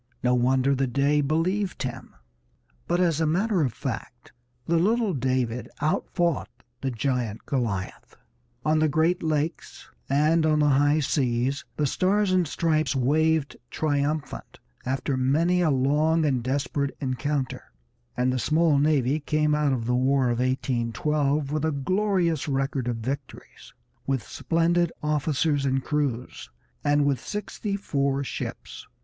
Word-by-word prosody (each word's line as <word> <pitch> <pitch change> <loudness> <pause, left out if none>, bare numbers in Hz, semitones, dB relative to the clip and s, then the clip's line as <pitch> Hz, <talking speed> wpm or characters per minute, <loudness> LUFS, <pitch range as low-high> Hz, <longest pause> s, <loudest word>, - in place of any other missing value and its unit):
No 125 0 +3
wonder 130 +2 +2
the 135 0 0
Dey 140 +4 +2
believed 175 +7 -1
him. 130 - -6 0.7
But 175 - +1
as 165 -3 +2
a 160 - +2
matter 190 +4 +1
of 135 -5 +1
fact - - -6 0.3
the 170 - +2
little 215 +2 +2
David 130 -3 -1
outfought 170 +2 0 0.3
the 135 - -1
giant 120 -3 -2
Goliath; 115 -9 -3 0.5
on 155 0 +3
the 155 0 +3
Great 160 +5 +1
Lakes 155 0 -3 0.2
and 155 +4 +3
on 155 -1 +3
the 150 -1 +3
high 145 +2 +3
seas 135 -1 0
the 150 - +1
Stars 190 +7 +1
and 180 -3 +2
Stripes 155 -1 0
waved 155 +3 +1
triumphant 150 0 -2 0.3
after 135 +1 -1
many 160 +8 +2
a 170 - +3
long 150 +4 +2
and 130 -4 +1
desperate 140 +2 -2
encounter, 135 0 -2 0.5
and 125 +1 +1
the 130 - -1
small 155 +5 +3
navy 145 -1 +2
came 150 0 +1
out 150 -1 +2
of 120 -4 -1
the 125 - 0
War 130 0 +2
of 120 - -2
1812 135 +3 0
with 155 0 -1
a 160 - +1
glorious 175 +1 0
record 135 -2 -1
of 120 - 0
victories, 130 +3 -7 0.3
with 135 -5 0
splendid 170 +4 +1
officers 150 -1 +1
and 135 -1 0
crews, 140 -5 -3 0.3
and 145 0 +3
with 140 -3 +1
sixty 205 - -4
four 140 -8 -1
ships. - - -6
145 Hz, 140 wpm, -25 LUFS, 130-160 Hz, 0.7 s, No